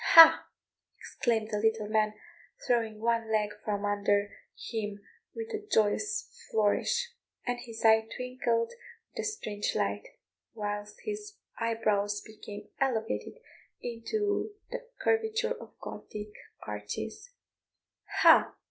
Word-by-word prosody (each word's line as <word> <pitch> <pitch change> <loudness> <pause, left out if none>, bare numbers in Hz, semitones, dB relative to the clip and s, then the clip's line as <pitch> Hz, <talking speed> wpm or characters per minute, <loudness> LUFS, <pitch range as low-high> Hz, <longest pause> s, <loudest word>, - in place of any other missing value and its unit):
"Ha!" 330 -1 +10 0.5
exclaimed 220 -3 -1
the 210 - 0
little 220 0 +1
man, 215 0 +2 0.5
throwing 225 -3 +1
one 230 0 +1
leg 210 -1 +2
from 205 -1 -1
under 205 0 +1 0.2
him 210 -3 -4 0.4
with 455 0 -4
a 435 -2 -4
joyous 410 - +2 0.2
flourish, 470 - +2 0.3
and 245 -1 -1
his 230 -2 -6
eye 220 0 +6
twinkled 250 -2 0 0.4
with - - -8
a - - 0
strange 215 - -2
light, 100 0 0 0.5
whilst 205 -1 -4
his 415 -1 -5 0.2
eyebrows 210 -3 +1
became 215 -1 -10
elevated 235 - -1 0.4
into 405 - -1 0.2
the - - -2 0.2
curvature 450 +1 +1
of - - -12
Gothic 210 0 -7 0.3
arches; 105 - -5 0.9
"Ha!" - - +7
220 Hz, 110 wpm, -30 LUFS, 210-265 Hz, 0.9 s, Ha